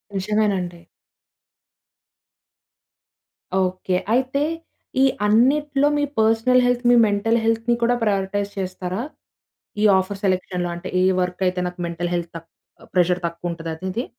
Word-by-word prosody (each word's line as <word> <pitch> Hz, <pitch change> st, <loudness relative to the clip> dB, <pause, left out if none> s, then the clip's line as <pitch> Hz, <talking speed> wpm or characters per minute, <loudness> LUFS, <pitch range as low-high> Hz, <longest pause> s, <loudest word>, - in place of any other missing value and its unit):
నిజమేనండి. 195 Hz, -3 st, -1 dB, 2.8 s
ఓకే. 185 Hz, 0 st, -1 dB, 0.2 s
అయితే, 260 Hz, +3 st, +1 dB, 0.6 s
ఈ -, -, +7 dB, 0.2 s
అన్నిట్లో 275 Hz, +6 st, +3 dB
మీ 290 Hz, -, +1 dB, 0.2 s
పర్సనల్ 225 Hz, +3 st, +4 dB
హెల్త్, 245 Hz, 0 st, +1 dB
మీ 245 Hz, -, +6 dB
మెంటల్ 215 Hz, +3 st, +1 dB
హెల్త్‌ని 230 Hz, +1 st, +1 dB
కూడా 245 Hz, +1 st, +3 dB
ప్రయారిటైజ్ 200 Hz, -1 st, -1 dB
చేస్తారా? 185 Hz, +1 st, -4 dB, 0.8 s
ఈ -, -, +3 dB
ఆఫర్ 195 Hz, +1 st, -3 dB
సెలక్షన్‌లో 180 Hz, -2 st, -1 dB
అంటే, 170 Hz, -, -7 dB
ఏ -, -, +3 dB, 0.2 s
వర్క్ 180 Hz, +1 st, -4 dB
అయితే 180 Hz, 0 st, -2 dB
నాకు 180 Hz, 0 st, -10 dB
మెంటల్ 170 Hz, +1 st, -3 dB
హెల్త్ 170 Hz, -1 st, -3 dB
తక్ 165 Hz, 0 st, -11 dB, 0.4 s
ప్రెషర్ 180 Hz, 0 st, +2 dB
తక్కువుంటది. 170 Hz, -1 st, -5 dB
అదీది. 190 Hz, +8 st, -4 dB
195 Hz, 120 wpm, -22 LUFS, 180-230 Hz, 2.8 s, ఈ